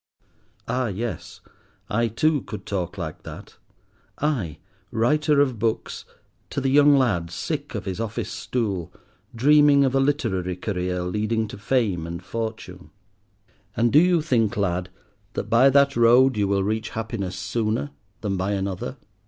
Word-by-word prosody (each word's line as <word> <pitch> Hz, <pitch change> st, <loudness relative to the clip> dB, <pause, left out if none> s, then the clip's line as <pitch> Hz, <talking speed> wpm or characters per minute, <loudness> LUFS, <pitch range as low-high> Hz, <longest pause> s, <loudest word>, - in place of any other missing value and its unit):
Ah, 125 Hz, +1 st, 0 dB
yes, 110 Hz, +3 st, -5 dB, 0.5 s
I 115 Hz, +1 st, +1 dB
too 145 Hz, +6 st, +1 dB
could 105 Hz, -, -8 dB
talk 95 Hz, -1 st, -3 dB
like 80 Hz, -4 st, -5 dB
that—I, 115 Hz, -, -6 dB, 0.3 s
writer 150 Hz, +6 st, +2 dB
of 130 Hz, -6 st, +2 dB
books, 110 Hz, -1 st, -2 dB, 0.4 s
to -, -, -2 dB
the 135 Hz, -1 st, 0 dB
young 145 Hz, 0 st, +6 dB
lad, 100 Hz, -11 st, +1 dB
sick 85 Hz, -, -4 dB
of -, -, -4 dB
his 95 Hz, +1 st, -4 dB
office 115 Hz, -1 st, -3 dB
stool, 100 Hz, -9 st, -3 dB, 0.4 s
dreaming 145 Hz, +2 st, +5 dB
of 130 Hz, -, 0 dB
a 135 Hz, -, +3 dB
literary 115 Hz, -, 0 dB
career 90 Hz, -1 st, -2 dB
leading 110 Hz, +4 st, -1 dB
to -, -, -8 dB
fame 105 Hz, -8 st, 0 dB
and 85 Hz, 0 st, -6 dB
fortune. 115 Hz, -1 st, -6 dB, 0.9 s
"And 115 Hz, +1 st, +2 dB
do 150 Hz, -, +8 dB
you 175 Hz, -2 st, +3 dB
think, 115 Hz, -10 st, +1 dB
lad, 90 Hz, -2 st, -1 dB, 0.4 s
that -, -, -4 dB
by 125 Hz, +4 st, +6 dB
that 140 Hz, 0 st, +4 dB
road 120 Hz, +3 st, +5 dB
you 105 Hz, -1 st, +1 dB
will 100 Hz, 0 st, +1 dB
reach 110 Hz, +2 st, -2 dB
Happiness 105 Hz, -5 st, -3 dB
sooner 110 Hz, +7 st, -2 dB, 0.3 s
than 100 Hz, -3 st, -2 dB
by 95 Hz, +2 st, -1 dB
another? 95 Hz, -2 st, -3 dB
115 Hz, 145 wpm, -24 LUFS, 95-135 Hz, 0.9 s, do